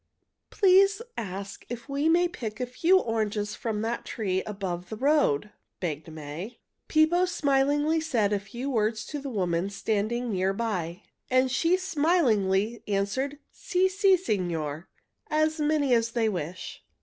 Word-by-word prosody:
Please 390 Hz, +1 st, +5 dB, 0.2 s
ask 200 Hz, -1 st, -6 dB
if 240 Hz, +1 st, -6 dB
we 285 Hz, +3 st, 0 dB
may 350 Hz, +2 st, +4 dB
pick 235 Hz, -10 st, -6 dB
a 250 Hz, -, 0 dB
few 330 Hz, +10 st, +3 dB
oranges 215 Hz, -, -1 dB
from 220 Hz, -2 st, -3 dB
that 230 Hz, +1 st, -2 dB
tree 195 Hz, -5 st, -2 dB
just -, -, -6 dB
above 180 Hz, -4 st, -4 dB
the 220 Hz, -, -4 dB
road," 240 Hz, -, +2 dB, 0.3 s
begged 160 Hz, -2 st, -4 dB
May. 160 Hz, +9 st, -7 dB, 0.3 s
Pippo 320 Hz, +3 st, +4 dB
smilingly 290 Hz, -1 st, +2 dB
said 230 Hz, -10 st, +1 dB
a 205 Hz, -, +1 dB
few 235 Hz, +7 st, -7 dB
words 220 Hz, -4 st, 0 dB
to 295 Hz, -, -5 dB
a 280 Hz, -, -4 dB
woman 180 Hz, -4 st, -1 dB
standing 220 Hz, +4 st, -1 dB
near 190 Hz, 0 st, +1 dB
by, 185 Hz, -6 st, -3 dB, 0.3 s
and 255 Hz, 0 st, +3 dB
she 335 Hz, +8 st, +3 dB
smilingly 240 Hz, -, +1 dB
answered, 210 Hz, +8 st, -1 dB
"Si, 370 Hz, +1 st, +1 dB
si, 385 Hz, 0 st, +4 dB
signor. 170 Hz, -, -2 dB, 0.4 s
As 310 Hz, +1 st, +1 dB
many 295 Hz, -3 st, +2 dB
as 230 Hz, -1 st, +3 dB
they 230 Hz, -2 st, +2 dB
wish." 180 Hz, -3 st, -5 dB
230 Hz, 150 wpm, -27 LUFS, 195-300 Hz, 0.4 s, Please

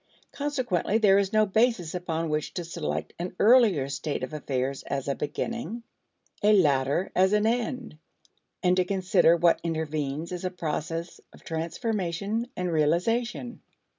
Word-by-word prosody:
Consequently 255 Hz, -9 st, 0 dB
there 200 Hz, -3 st, +5 dB
is 195 Hz, -1 st, 0 dB
no 215 Hz, 0 st, +4 dB
basis 215 Hz, -4 st, +1 dB
upon 165 Hz, -2 st, -2 dB
which 150 Hz, 0 st, -2 dB
to 175 Hz, -, -2 dB
select 165 Hz, -1 st, -4 dB
an 180 Hz, +1 st, -4 dB
earlier 210 Hz, -, +5 dB
state 140 Hz, 0 st, -3 dB
of 130 Hz, -, -5 dB
affairs 135 Hz, -2 st, -2 dB
as 140 Hz, -1 st, -3 dB
a 140 Hz, -, +1 dB
beginning, 230 Hz, -, -4 dB, 0.6 s
a 210 Hz, +1 st, +5 dB
later 145 Hz, -1 st, +2 dB
as 190 Hz, +2 st, +4 dB
an 210 Hz, 0 st, +3 dB
end, 240 Hz, -5 st, -2 dB, 0.6 s
and 180 Hz, 0 st, +4 dB
to 185 Hz, -, +4 dB
consider 180 Hz, -3 st, +3 dB
what 170 Hz, 0 st, +4 dB
intervenes 155 Hz, -1 st, -3 dB
as 180 Hz, 0 st, -5 dB
a 185 Hz, -, 0 dB
process 165 Hz, -1 st, -4 dB
of -, -, -17 dB
transformation 195 Hz, +5 st, -2 dB
and 180 Hz, -1 st, -1 dB
realization. 225 Hz, +10 st, 0 dB
180 Hz, 145 wpm, -27 LUFS, 155-215 Hz, 0.6 s, there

